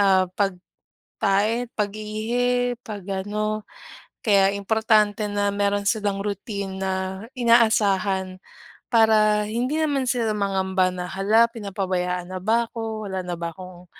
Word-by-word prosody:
ah, 190 -2 +4 0.7
pag-tae 215 +5 0
at - - -49
pag-ihi, 225 +4 -1
pag-ano. 210 0 -3 0.6
Kaya 195 -3 +5
importante 215 0 +2
na 205 0 0
meron 200 0 0
silang 205 -3 -1
routine 200 -1 -4
na 190 0 0 0.4
inaasahan 200 -5 +3 0.5
para 215 -2 +4
hindi 250 +7 -1
naman 285 -4 +1
sila 240 -3 0
mangamba 190 -2 +1
na, 180 -1 -5
"Hala 210 +4 +3
pinapabayaan 185 -4 -3
na 185 - -4
ba 230 +3 +2
ako, 220 -2 -5
wala 190 -1 -3
na 175 -1 -3
ba 170 0 -3
akong, 180 -1 -11
205 Hz, 120 wpm, -23 LUFS, 190-225 Hz, 0.7 s, Kaya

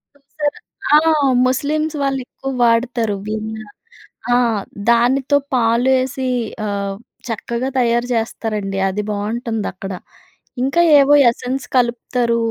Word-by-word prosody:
చూసారా 290 +1 -4 0.4
ఆ! - - +9 0.5
ముస్లిమ్స్ 305 +4 -1
వాళ్ళు 270 -1 0
ఎక్కువ 270 - -6
వాడతారు 230 -2 +1
విన్న. 220 +1 -4 0.8
ఆ! - - +5 0.5
దానితో 255 +4 +3 0.2
పాలు 235 +1 +2
ఏసి 260 0 -3 0.4
ఆహ్, 200 -1 -3 0.3
చక్కగా 235 +3 -3
తయారు 240 0 +1
చేస్తారండి. 215 -3 -2
అది 200 +2 -2
బావుటుందక్కడ. 210 -2 -3 0.7
ఇంకా 275 +6 +2 0.2
ఏవో 280 +1 +5 0.2
ఎసెన్స్ 255 +3 -3
కలుపుతారు. 240 -1 +1
235 Hz, 100 wpm, -18 LUFS, 220-265 Hz, 0.8 s, ఆ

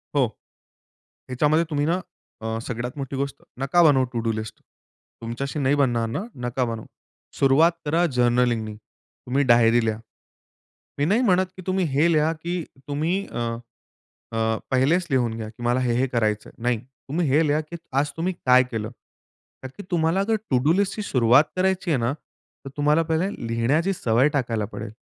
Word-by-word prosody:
हो. 140 -3 +4 1.0
ह्याच्यामध्ये 150 +6 +2
तुम्ही 145 -2 0
ना 170 +4 +1 0.4
अ, 110 0 -3
सगळ्यात 120 +3 -5
मोठी 135 -1 -4
गोष्ट 140 +1 -2 0.2
नका 135 +6 +3
बनवू 140 -5 +5
टू 120 - -1
डू 115 0 0
लिस्ट. 110 -1 -5 0.7
तुमच्याशी 120 +6 -4
नाही 140 0 +2
बनणार 120 -5 +1
ना? 115 - -3 0.2
नका 120 +1 -1
बनवू. 115 -2 -5 0.5
सुरुवात 140 +5 +5
करा 165 +4 +2
जर्नलिंगनी 120 -3 +1
तुम्ही 125 +5 -5
डायरी 120 0 +5
लिहा. 110 -1 0 1.0
मी 145 - +1
नाही 210 +9 +2
म्हणत 190 -6 +3
की - - -7
तुम्ही 185 -1 +1
हे 155 +5 +3
लिहा 155 +1 +3
की 175 +1 -3 0.3
तुम्ही 155 +5 0 0.2
अ, - - -4 1.0
अ, 110 0 +1
पहिलेच 150 +8 +2
लिहून 120 -4 +1
घ्या 110 -1 -5
की 115 +2 -12
मला 120 +1 +2
हे, 125 -2 +1
हे 130 - +2
करायचंय. 110 -4 -1
नाही 120 -1 0
तुम्ही 135 +6 -4
हे 150 +4 +3
लिहा 150 +2 +2
की 170 - -6 0.2
आज 145 +1 0
तुम्ही 180 +3 -1
काय 125 0 +6
केलं? 110 -2 -3 0.7
तर 130 +8 -8
तुम्हाला 170 +3 +2
जर 220 +2 +1
टू 130 - +3
डू 155 +3 +4
लिस्टची 200 +3 0
सुरुवात 125 - +4
करायची 185 -1 0
आहे 145 - +3
ना, 120 +3 0
तर 140 -2 -16
तुम्हाला 150 +3 +3
पहिले 165 +4 0 0.2
लिहिण्याची 135 +11 +1
सवय 125 -3 +2
टाकायला 120 -6 0
पडेल. - - -6
135 Hz, 170 wpm, -24 LUFS, 120-160 Hz, 1.0 s, काय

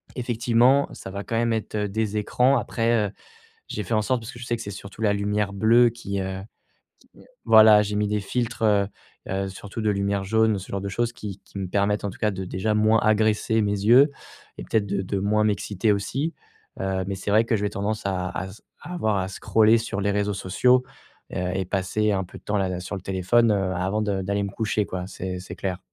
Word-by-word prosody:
effectivement, 120 +2 +2
ça - - -9
va 100 +1 -5
quand 115 - -2
même 115 0 +1
être, 110 -1 -3
heu, 105 -1 -1
des 110 0 -1
écrans. 125 +5 +3
Après, 115 -3 +1
heu, - - -13 0.6
j'ai 105 - -3
fait 105 - -4
en 110 - +3
sorte, 125 +2 0
parce 120 - -7
que 120 - -11
je 125 - -7
sais 120 - 0
que 115 - -7
c'est 100 - -6
surtout 100 +2 -10
la 105 -1 +3
lumière 100 0 -1
bleue 115 +4 +5
qui, 100 -4 -5
heu, 95 0 -4 0.8
qui - - -23 0.2
voilà, 110 -1 +8
j'ai 105 0 -3
mis 105 0 +1
des 105 0 0
filtres, 120 +2 -3
heu 100 -2 +3 0.4
heu, 95 +1 -2
surtout 100 +3 -7
de 105 - +2
lumière 100 0 0
jaune, 110 0 +2
ce 95 - -9
genre 100 - -2
de 100 - -3
choses 120 +4 -1
qui 100 -4 -7
qui 100 - -10
me 95 - -3
permettent 105 +2 0
en 100 - 0
tout - - -13
cas 105 - +1
de 95 0 -5
déjà 105 +4 -1
moins 110 +1 +4
agresser 110 +1 +2
mes 100 - 0
yeux 125 +7 +6 0.5
et - - -5
peut-être 110 -2 0
de 100 0 -1
de 95 +1 -2
moins 105 +2 +1
m'exciter 105 0 +1
aussi. 135 +11 -2 0.5
Heu, 95 -1 -1
mais 100 - -2
c'est 100 +2 -4
vrai 110 +2 +5
que 115 -1 +1
je 100 - -4
vais 105 - 0
tendance 105 +2 -2
à 90 -2 -2 0.2
s 100 +3 -13 0.2
à 180 - -7
avoir 110 - 0
à 95 - -2
scroller 110 +3 +3
sur 105 -3 -3
les 100 - +1
réseaux 105 0 0
sociaux, 125 +7 +3 0.5
heu - - -2
et 95 0 -1
passer 100 +3 0
un 95 -1 0
peu - - -12
de - - -22
temps 105 0 0
là 95 -1 0
là, 90 -1 -3
sur 100 +3 -5
le 95 - -8
téléphone, 95 +5 +2
heu, 95 -2 0
avant 95 +4 -1
de 100 -2 -1
d'aller 100 +2 -1
me 100 - -4
coucher 110 -1 -1
quoi, 90 0 -5
c'est 90 -1 -5
c'est 90 - -9
clair. 95 -2 -3
105 Hz, 240 wpm, -24 LUFS, 95-110 Hz, 0.8 s, voilà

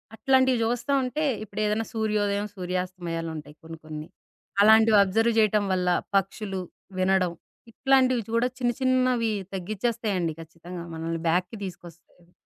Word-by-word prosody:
అట్లాంటివి 260 0 +3
జూస్తా 240 +4 -1
ఉంటే 255 +5 -2 0.2
ఇప్పుడేదన్నా 215 +2 -1
సూర్యోదయం, 210 -2 0
సూర్యాస్తమయాలుంటాయి 175 -4 -4
కొన్ని 165 0 -9
కొన్ని. 155 0 -7 0.5
అలాంటివి 220 0 +6
అబ్జర్వ్ 225 +4 +2
జేయటం 210 -1 +3
వల్ల 180 -1 +1 0.3
పక్షులు 195 0 -2 0.4
వినడం 185 -2 +2 0.4
ఇట్లాంటివి 260 -1 +3
చూడగ 230 +2 +1
చిన్న 240 -1 +2
చిన్నవి 255 -3 +2 0.2
తగ్గిచ్చేస్తాయండి 200 -3 -1
ఖచ్చితంగా. 170 +2 -9
మనల్ని 165 +1 -3
బ్యాక్‌కి 180 +6 0
తీసుకొస్తాయి. 175 0 -12
205 Hz, 110 wpm, -26 LUFS, 175-230 Hz, 0.5 s, అలాంటివి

